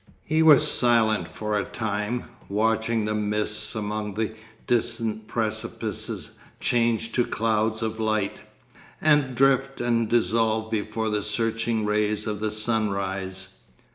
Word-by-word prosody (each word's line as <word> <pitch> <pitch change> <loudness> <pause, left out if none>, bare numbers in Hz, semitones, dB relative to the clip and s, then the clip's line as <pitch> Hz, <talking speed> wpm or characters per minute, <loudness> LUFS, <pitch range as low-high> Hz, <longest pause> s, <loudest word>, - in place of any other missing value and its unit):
He 155 0 +2
was 155 -3 +7
silent 115 -3 +3
for 105 -1 -3
a 100 - +1
time, 105 +3 -3 0.3
watching 110 +2 +1
the 105 - -1
mists 105 0 -2
among 105 -1 -3
the 110 0 -1 0.3
distant 115 -2 0
precipices 110 -1 -3 0.3
change 115 -1 +1
to 120 - +2
clouds 110 -1 0
of 110 0 -3
light, 110 -2 0 0.6
and 145 -4 +3
drift 135 +1 +2
and 115 -2 +1
dissolve 110 -1 +1
before 110 +1 -1
the 105 -1 0
searching 115 +1 -1
rays 105 0 0
of 105 -2 -3
the 110 0 -1
sunrise. 100 -4 -2
110 Hz, 125 wpm, -25 LUFS, 105-115 Hz, 0.6 s, was